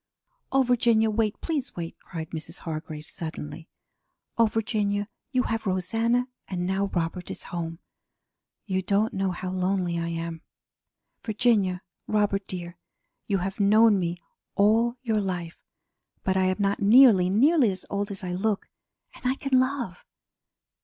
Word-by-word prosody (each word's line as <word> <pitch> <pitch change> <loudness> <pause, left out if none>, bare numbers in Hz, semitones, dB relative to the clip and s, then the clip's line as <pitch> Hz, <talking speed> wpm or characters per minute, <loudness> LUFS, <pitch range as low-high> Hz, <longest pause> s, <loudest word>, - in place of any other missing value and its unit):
"Oh, 270 0 +4
Virginia, 230 -3 +3
wait; 215 -1 0
please 295 -5 -2
wait!" 165 -1 -5
cried 160 -1 -7
Mrs. 160 -2 -6
Hargrave 155 -1 -6
suddenly. 160 -2 -6 0.7
"Oh, 230 -1 +5
Virginia, 210 -2 -1 0.2
you 255 -2 +2
have 225 -1 -2
Rosanna, 225 +7 +1 0.2
and 180 -2 -3
now 190 +2 +1
Robert 175 -1 -3
is - - -6
home. 165 -1 -3 0.9
You 190 -2 0
don't 200 +4 +1
know 195 0 0
how 185 +1 -4
lonely 185 -2 0
I 170 - -2
am. 165 -1 -4 0.8
Virginia, 210 -5 +1 0.2
Robert 205 -2 +1
dear, 175 -1 -6 0.5
you 200 - +2
have 195 +2 -5
known 210 +1 +5
me 175 -1 -2 0.4
all 225 +4 +3
your 220 -4 +1
life 175 -4 -4 0.6
but 190 - +1
I 190 0 +3
am 185 0 +1
not 200 -1 +1
nearly, 210 -3 +7
nearly 265 - +4
as 185 -1 -5
old 200 +1 -1
as 195 -2 -6
I 180 - -3
look, 195 +3 -1 0.5
and - - -15
I 260 - +2
can 270 -2 +2
love. 255 -8 -2
195 Hz, 145 wpm, -26 LUFS, 180-225 Hz, 0.9 s, nearly